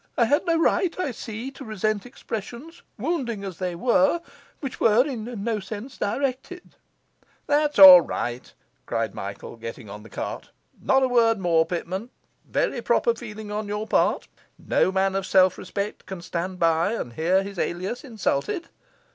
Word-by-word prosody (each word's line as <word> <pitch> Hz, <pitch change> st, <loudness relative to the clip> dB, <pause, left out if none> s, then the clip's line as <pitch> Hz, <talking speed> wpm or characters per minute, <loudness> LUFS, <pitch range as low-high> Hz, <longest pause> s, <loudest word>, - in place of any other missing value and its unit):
I 235 Hz, -, +4 dB
had 290 Hz, +9 st, +1 dB
no 335 Hz, -1 st, +3 dB
right, 350 Hz, +2 st, +1 dB
I 300 Hz, -7 st, -1 dB
see, 230 Hz, +3 st, -6 dB
to 270 Hz, -, -11 dB
resent 215 Hz, 0 st, -2 dB
expressions, 240 Hz, -, -7 dB, 0.2 s
wounding 240 Hz, -, -2 dB
as 190 Hz, -4 st, -7 dB
they 180 Hz, -2 st, -2 dB
were, 275 Hz, -, +3 dB, 0.4 s
which 275 Hz, -4 st, -6 dB
were 225 Hz, +3 st, +4 dB
in 235 Hz, -6 st, -5 dB
no 225 Hz, -1 st, -1 dB
sense 215 Hz, +6 st, -8 dB
directed.' 270 Hz, -, -3 dB, 0.7 s
'That's 295 Hz, 0 st, +1 dB
all 185 Hz, -3 st, +12 dB
right,' 120 Hz, -5 st, -4 dB, 0.4 s
cried -, -, -1 dB
Michael, -, -, -7 dB
getting 115 Hz, -2 st, -8 dB
on 105 Hz, +1 st, -8 dB
the 110 Hz, -, -14 dB
cart. -, -, -6 dB, 0.3 s
'Not 265 Hz, 0 st, +3 dB
a -, -, +4 dB
word 230 Hz, -2 st, +3 dB
more, 170 Hz, -4 st, +2 dB
Pitman. 185 Hz, +6 st, -4 dB, 0.4 s
Very -, -, 0 dB
proper 470 Hz, -, +2 dB
feeling 215 Hz, -, -8 dB
on 210 Hz, 0 st, -3 dB
your 210 Hz, +1 st, -3 dB
part; -, -, +1 dB, 0.3 s
no -, -, +1 dB
man 190 Hz, 0 st, +1 dB
of 195 Hz, -1 st, -2 dB
self 185 Hz, -1 st, +4 dB
respect 200 Hz, -1 st, -5 dB
can 185 Hz, -2 st, -7 dB
stand 180 Hz, +1 st, -4 dB
by 165 Hz, +3 st, +2 dB
and 120 Hz, -, -4 dB
hear 180 Hz, +7 st, +2 dB
his 195 Hz, -2 st, -7 dB
alias 185 Hz, +8 st, -3 dB
insulted. 220 Hz, -, -2 dB
215 Hz, 165 wpm, -24 LUFS, 185-255 Hz, 0.7 s, all